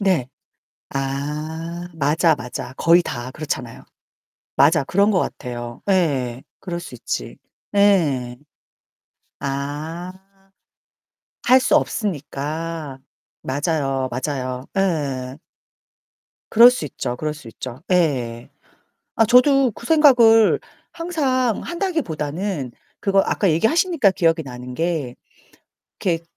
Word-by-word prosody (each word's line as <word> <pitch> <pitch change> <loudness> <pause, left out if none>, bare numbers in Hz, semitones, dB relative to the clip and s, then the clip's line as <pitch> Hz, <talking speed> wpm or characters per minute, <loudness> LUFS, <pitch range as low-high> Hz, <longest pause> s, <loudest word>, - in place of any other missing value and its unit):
네. 185 -11 +1 0.6
아. 150 +5 -4
맞아, 160 +2 +3
맞아. 125 -1 -7
거의 170 +1 +5
다 120 -5 -5
그렇잖아요. 135 -6 -5 0.7
맞아. 150 +3 +4
그런 200 +9 +2
것 185 - +2
같아요. 120 -4 -5
예예. 135 -10 +1 0.2
그럴 175 -2 -5
수 175 - -9
있지. - - -5 0.4
예. 150 -12 +3 1.0
아. 150 +6 -4 1.3
할 255 +2 +6
수 - - +3
없으니까. 155 - -3 0.4
맞아요. 135 -2 -1
맞아요. 130 0 -3
예. 140 -9 -1 1.1
그럴 235 +2 +9
수 250 -11 -3
있죠, 125 -3 -4
그럴 155 +4 -3
수 145 -6 -13
있죠. 125 +2 -8
예예. 130 -10 0 0.7
아 225 - +4
저도 255 +2 +5
그 - - -12
생각을 245 -9 +6 0.3
항상 275 -9 0
한다기보다는 190 - -3 0.3
그거 195 -1 +2
아까 195 - +1
얘기하시니까 285 - +3
기억이 165 -3 +1
나는 125 -1 -8
게 160 -5 -2 0.9
이렇게 170 -3 0
160 Hz, 205 characters per minute, -21 LUFS, 135-200 Hz, 1.3 s, 그럴